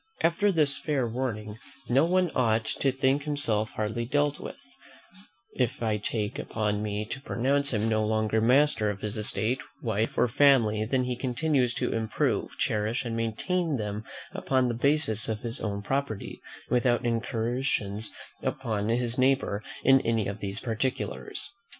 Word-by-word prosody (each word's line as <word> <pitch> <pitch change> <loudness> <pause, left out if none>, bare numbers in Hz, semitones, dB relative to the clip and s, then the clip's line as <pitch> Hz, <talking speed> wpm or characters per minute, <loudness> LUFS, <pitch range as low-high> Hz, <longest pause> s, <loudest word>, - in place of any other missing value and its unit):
After 170 +5 +3
this 150 -5 +2
fair 140 -6 0
warning, 110 -3 -4 0.3
no 130 +6 +4
one 180 -1 +2
ought 115 -3 +2
to 135 +5 0
think 135 +2 +1
himself 115 -8 +1
hardly 110 +2 -2
dealt 145 +4 +1
with, - - -7 1.0
if 125 -2 -1
I 110 -2 +1
take 105 0 -2
upon 105 -1 -1
me 105 0 -2
to 135 +5 -6
pronounce 140 +2 +1
him 110 -2 0
no 110 -1 +2
longer 110 0 +1
master 125 -2 +4
of 100 -1 -5
his 105 +1 -1
estate, 110 +3 +2 0.2
wife, 110 -1 -1
or - - +4
family, 115 -5 +4
than 125 +3 +1
he 125 0 -2
continues 125 -1 0
to - - -1
improve, 110 -1 -1
cherish, 110 +4 0
and 115 -1 -3
maintain 145 - -1
them 105 -1 -4 0.3
upon 130 -2 +1
the - - 0
basis 120 -4 +1
of 110 -1 -2
his 115 +1 -4
own 100 -2 -3
property, 135 -2 -3 0.3
without 125 0 +2
incursions 115 -2 -1 0.3
upon 110 -5 -2
his 120 +1 +1
neighbour 130 -6 +2 0.2
in 135 0 +6
any 115 -2 0
of 100 +1 -5
these 100 +1 -3
particulars. 120 +2 -3
115 Hz, 155 wpm, -28 LUFS, 110-135 Hz, 1.0 s, in